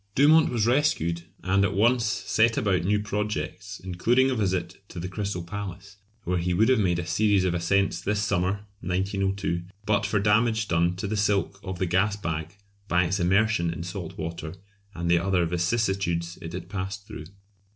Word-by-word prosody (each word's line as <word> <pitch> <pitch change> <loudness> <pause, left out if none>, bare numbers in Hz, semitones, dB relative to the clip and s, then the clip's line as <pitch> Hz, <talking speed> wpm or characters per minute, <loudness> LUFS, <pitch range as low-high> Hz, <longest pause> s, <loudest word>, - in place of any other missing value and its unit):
Dumont 155 +3 +6
was 115 -3 0
rescued, 115 - +1 0.2
and 95 +2 +2
at 100 - 0
once 120 +4 +3
set 115 +2 +1
about 100 -10 +1
new 105 +2 +2
projects, 105 -1 -4
including 120 +9 +2
a - - 0
visit 95 -4 -2
to 90 - -7
the 90 - -4
Crystal 95 -1 -3
Palace, 100 +1 -7 0.3
where 90 0 0
he 90 +1 0
would 110 +6 +4
have 130 - +4
made 90 -4 +2
a 85 - -3
series 100 +3 +2
of 90 -2 +1
ascents 90 +1 +1
this 105 +2 -1
summer 100 0 0
(1902) 95 0 -1 0.2
but 105 -1 +1
for 105 - 0
damage 110 +2 +2
done 85 0 +1
to 95 - -5
the 105 +2 -2
silk 100 -1 0
of 95 -1 -5
the 95 - 0
gas 95 +4 +2
bag 80 -3 -4 0.3
by 90 -1 +3
its 95 +3 -1
immersion 95 -1 +2
in 85 0 -5
salt 90 -1 -6
water 85 0 -5 0.4
and 85 0 -3
the 85 0 +4
other 90 -1 +1
vicissitudes 85 -1 0
it 80 +1 -7
had 90 - -6
passed 100 +2 -5
through. 80 - -8
95 Hz, 180 wpm, -26 LUFS, 85-105 Hz, 0.4 s, Dumont